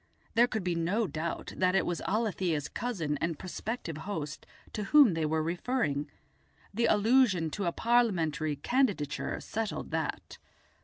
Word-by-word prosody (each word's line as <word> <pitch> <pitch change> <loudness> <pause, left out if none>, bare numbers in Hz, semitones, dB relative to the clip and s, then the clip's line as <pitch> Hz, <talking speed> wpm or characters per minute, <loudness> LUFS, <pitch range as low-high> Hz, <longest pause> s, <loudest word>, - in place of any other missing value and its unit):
There 235 +2 +5
could 220 -5 -3
be 180 -1 0
no 180 +7 0
doubt 165 -2 -4
that 185 0 +2
it - - +3
was 175 - -2
Alethia's 190 -8 0
cousin 170 - -2
and 165 -2 -1
prospective 185 -2 -5
host 160 -4 -5 0.3
to 210 - -3
whom 280 -3 +6
they 160 -1 0
were 160 0 0
referring; 165 - -1 0.6
the 230 +3 +2
allusion 210 -7 +3
to 200 +3 -3
a 170 - +1
Parliamentary 170 -11 +1
candidature 200 - 0
settled 220 -1 -4
that. - - -3
185 Hz, 145 wpm, -30 LUFS, 160-225 Hz, 0.6 s, whom